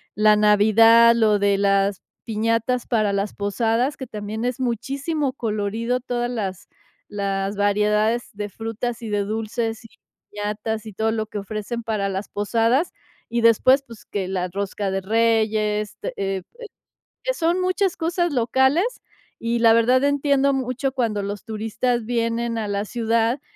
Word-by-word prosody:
la 215 0 +5
Navidad, 220 +3 +6
lo 215 -3 +3
de 200 -1 +2
las 200 -1 +2 0.2
piñatas 230 +3 0
para 215 -3 +1
las 200 +1 -1
posadas, 225 +6 0
que 260 - -7
también 215 +1 -5
es 250 +1 -2
muchísimo 270 +4 -2
colorido, 225 +2 -2
todas 245 -1 -2
las 195 -6 -4 0.4
las 200 -1 -2
variedades 210 +3 +1
de 205 0 -4
frutas 225 +3 -4
y 225 - -6
de 205 -1 0
dulces 225 +2 -3
y 225 - -14 0.4
piñatas 210 +1 -3
y 215 - -8
todo 220 +2 0
lo 220 -1 -2
que 210 -1 -6
ofrecen 215 +3 -5
para 215 -3 -1
las 195 +1 -4
posadas. 230 - +1 0.4
Y 235 0 0
después, 255 +4 +5
pues 230 -3 -13
que 195 -3 -3
la 185 -1 -1
rosca 200 +2 -3
de 195 0 -1
reyes 215 0 +1
de, - - -4
eh 195 -1 -2 0.8
que - - +1
son 340 -4 +1
muchas 370 0 +1
cosas 345 +1 0
locales. 265 - +2 0.5
Y 235 +1 -1
la 230 -1 +6
verdad 240 +3 +4
entiendo 280 -1 +2
mucho 265 0 -2
cuando 225 -6 -1
los 200 0 -5
turistas 225 +2 -2
vienen 230 0 -1
a 220 -2 -2
la 200 +1 -1
ciudad 230 +3 0
225 Hz, 155 wpm, -22 LUFS, 210-245 Hz, 0.8 s, Navidad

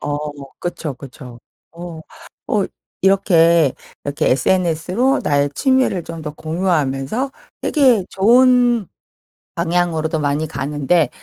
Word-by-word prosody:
어 145 0 -2 0.4
그쵸, 170 -4 -4
그쵸. 130 -2 -11 0.3
어. 170 -1 -8 0.5
어 205 -2 +1 0.4
이렇게 170 -6 +4 0.3
이렇게 145 +2 -1
SNS로 180 - +1
나의 145 0 +1
취미를 260 -9 +1
좀 165 -1 -8
더 150 - -4
공유하면서 160 - -1 0.3
되게 255 - +3
좋은 240 +1 +4 0.7
방향으로도 170 -2 0
많이 145 +2 0
가는데 145 +3 0
170 Hz, 230 characters per minute, -19 LUFS, 150-195 Hz, 0.7 s, 이렇게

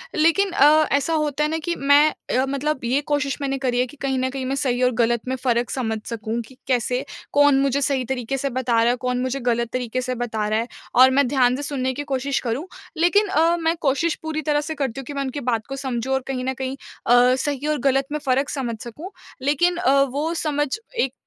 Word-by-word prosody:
लेकिन 330 +6 +3
अ, 305 0 +5
ऐसा 285 +4 +1
होता 300 -2 0
है 300 - +1
ना? 320 - -1
कि 340 +2 -3
मैं 285 +2 +5 0.3
अ, 260 - +2
मतलब 280 +1 -1
ये 255 +4 +1
कोशिश 290 -1 0
मैंने 275 -1 -1
करी 250 -2 0
है 250 - +3
कि 295 - -15
कहीं 270 -1 0
न 260 0 0
कहीं 265 0 -4
मैं 270 +2 -1
सही 255 -3 0
और 250 - +4
ग़लत 235 0 +2
में 260 - -1
फ़र्क 240 -1 +1
समझ 225 -4 -2
सकूँ 225 0 -3
कि 260 - -17
कैसे 250 +1 0 0.3
कौन 290 -1 +5
मुझे 275 +1 +1
सही 265 -2 0
तरीक़े 265 +1 -3
से 275 +1 -2
बता 255 -1 -2
रहा 235 - +3
है, - - 0
कौन 250 0 -2
मुझे 260 +1 -2
ग़लत 235 -2 0
तरीक़े 250 0 -2
से 255 0 -3
बता 225 -3 -2
रहा 215 +1 +1
है 230 - -2 0.3
और 260 +1 +7
मैं 275 0 +3
ध्यान 250 -1 +3
से 285 - -5
सुनने 260 -3 -2
की 290 +3 -4
कोशिश 275 -1 -1
करूँ। 255 +9 -3 0.3
लेकिन 405 +6 +3
अ, 340 -2 +3
मैं 330 0 0
कोशिश 300 +3 +1
पूरी 315 -1 -3
तरह 295 0 +1
से 315 +1 -5
करती 270 -3 -3
हूँ 270 - -7
कि 290 - -7
मैं 280 - -2
उनकी 265 +2 -4
बात 225 -2 -1
को 270 - -5
समझूँ 265 -2 -3
और 265 - +1
कहीं 255 -2 -3
न 265 - -1
कहीं 260 0 -4 0.3
अ, 245 +1 +5
सही 285 +1 -2
और 305 - +1
ग़लत 270 0 +1
में 300 - -2
फ़र्क 270 +2 +1
समझ 240 -5 -3
सकूँ। 300 - -8 0.3
लेकिन 320 +6 +2
अ, 275 -6 +3
वो 285 +5 -1
समझ 295 -3 0 0.3
एक 265 - +1
270 Hz, 240 wpm, -22 LUFS, 250-290 Hz, 0.3 s, और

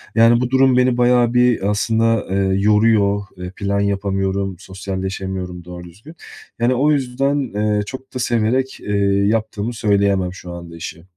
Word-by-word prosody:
Yani, 115 +1 +5
bu 125 - -1
durum 130 -1 +4
beni 125 -1 +2
bayağı 120 -1 +3
bir 125 -5 +2
aslında, 115 +1 +1
eee, 95 0 0
yoruyor. 105 -1 +3 0.2
Iıı, 90 0 -7
plan 100 0 -2
yapamıyorum, 95 -1 -1
sosyalleşemiyorum 95 -2 -5
doğru 90 0 -9
düzgün, 105 - -14 0.4
yani. 120 +2 +2
O 145 +4 +2
yüzden, 135 0 -1
eee, 105 0 0
çok 130 +2 -9
da - - -2
severek, 120 +3 0
eee, 105 0 -2 0.3
yaptığımı 110 +1 -1
söyleyemem 100 -4 +1
şu 90 -1 -10
anda 85 -1 -9
işi. 85 +1 -8
105 Hz, 150 wpm, -19 LUFS, 95-120 Hz, 0.4 s, Yani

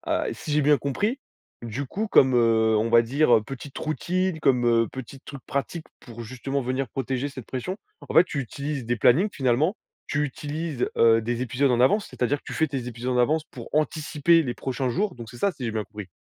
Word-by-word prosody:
ah, - - 0
si 150 - -6
j'ai 150 0 +3
bien 145 0 +4
compris, 205 - -1 0.4
du 120 +5 -4
coup, 215 - -3
comme, 130 -10 +5
heu, 110 -2 +3
on 110 - 0
va 115 0 +6
dire, 130 +2 +3
heu, 110 - -6
petites 135 +3 -9
routines, 180 +3 -1
comme, 125 -5 +2
heu, 115 -1 +3
petites 130 +1 -9
trucs 140 -2 -10
pratiques 155 +4 -3
pour, 120 -1 -10
justement, 130 +4 -3
venir 130 +2 -2
protéger 135 +1 -2
cette 130 -4 -9
pression, 135 +9 -4 0.3
en - - -5
fait, 165 - +9
tu 150 - -5
utilises 140 0 -4
des 120 - +1
plannings, 150 - +4
finalement. 140 - +1 0.3
Tu 145 0 0
utilises, 150 0 -3
heu, 115 -1 +5
des 120 +1 -2
épisodes 130 +3 +1
en 120 - +2
avance, 200 +12 +3
c'est-à-dire 130 +4 -1
que - - -26
tu - - -7
fais 160 - +1
tes 135 -4 -4
épisodes 125 +1 -4
en 125 - +1
avance 150 +6 +2
pour 125 -7 -11
anticiper 155 +2 +2
les 125 -5 -3
prochains 130 +1 -3
jours. 190 - -1
Donc 115 -2 -9
c'est 120 - -12
ça, 200 +9 +1
si 130 - -8
j'ai 115 - -1
bien 110 -1 -2
compris? 105 -1 -9
135 Hz, 220 wpm, -25 LUFS, 120-150 Hz, 0.4 s, fait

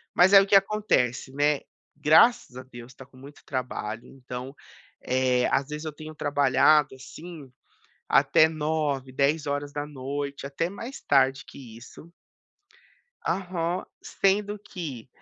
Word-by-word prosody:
mas 185 +3 +5
aí, 195 - +10
o - - -6
que 200 - +4
acontece, 195 - +1
né, 145 0 +1 0.4
graças 155 - +4
a 130 - -8
Deus 120 0 -13
tá 135 - -13
com 130 -1 -21
muito 140 +2 -14
trabalho, 120 -4 -5
então, 125 0 -8 0.5
eh, 125 -1 +1
às 135 0 +1
vezes, 150 +1 -6
eu 155 - -4
tenho 155 +1 -10
trabalhado, 145 0 +3
assim, 150 +1 -11 0.6
até 155 - +5
21h, 150 -4 -2
22h 145 +3 +1
horas 145 +1 -3
da 145 0 -3
noite, 140 0 -5
até 165 +5 -2
mais 230 +7 -8
tarde 135 0 +2
que 115 -5 -12
isso. 155 +7 -14 1.2
Aham. 180 -1 -2 0.2
Sendo 205 +1 0
que, 145 - -8
145 Hz, 140 wpm, -26 LUFS, 130-165 Hz, 1.2 s, aí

